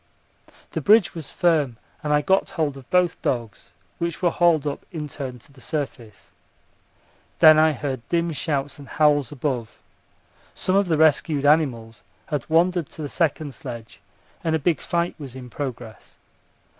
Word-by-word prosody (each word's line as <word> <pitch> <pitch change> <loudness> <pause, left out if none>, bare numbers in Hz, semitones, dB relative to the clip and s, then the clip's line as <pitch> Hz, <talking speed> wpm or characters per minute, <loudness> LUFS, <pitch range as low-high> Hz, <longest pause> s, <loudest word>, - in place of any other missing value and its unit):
The - - -3
bridge 210 -2 +5
was 160 -5 -7
firm 155 -9 +1 0.2
and 150 - -2
I 150 0 +4
got 190 +4 +2
hold 150 -4 -1
of 135 -2 -13
both 180 -2 +2
dogs, 115 -5 -3 0.3
which 170 -1 -2
were 175 -2 +2
hauled 170 -4 +3
up 145 - -3
in 155 -3 -5
turn 130 -4 -6
to 120 - -20
the 130 - -17
surface. 120 -10 -5 1.1
Then 155 -1 +8
I 155 0 +4
heard 135 -3 -4
dim 170 0 +1
shouts 145 -2 -2
and 140 - -11
howls 150 -2 +2
above. 130 -5 -3 0.8
Some 185 - 0
of 200 -1 +3
the 160 -3 +1
rescued 155 -1 +3
animals 125 -7 +2 0.2
had 150 -4 -4
wandered 170 0 +2
to 155 - -8
the 145 - -4
second 155 -3 -1
sledge, 120 -6 -9 0.4
and 160 -1 +1
a - - +3
big 160 0 0
fight 170 0 -1
was 135 -4 -8
in 125 -2 -9
progress. 125 -5 -7
150 Hz, 165 wpm, -23 LUFS, 130-165 Hz, 1.1 s, Then